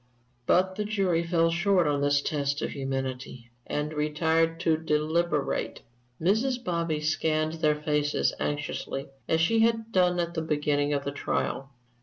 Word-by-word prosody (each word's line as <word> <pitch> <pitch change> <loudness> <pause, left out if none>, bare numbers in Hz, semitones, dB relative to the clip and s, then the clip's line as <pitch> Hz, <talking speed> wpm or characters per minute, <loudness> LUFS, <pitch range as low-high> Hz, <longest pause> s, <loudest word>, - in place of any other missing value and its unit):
But 185 +1 +3
the 210 - 0
jury 195 -5 +1
fell 165 -1 +2
short 180 +1 +2
of 145 -1 +1
this 145 0 +2
test 145 -1 -1
of - - -2
humanity, 130 -3 -4 0.2
and 150 +1 -2
retired 160 +2 +1
to 160 -2 +3
deliberate. 155 0 -1 0.4
Mrs. 240 +8 +1
Bobby 170 -5 -1
scanned 155 0 0
their 150 -1 +2
faces 150 -1 +1
anxiously, 145 -2 -3 0.2
as 160 - +3
she 225 +7 +3
had 225 0 +2
done 180 -3 +3
at 170 0 -1
the 160 - -2
beginning 150 -2 0
of 140 -1 0
the 140 - -3
trial. 135 -1 -2
155 Hz, 150 wpm, -27 LUFS, 145-175 Hz, 0.4 s, But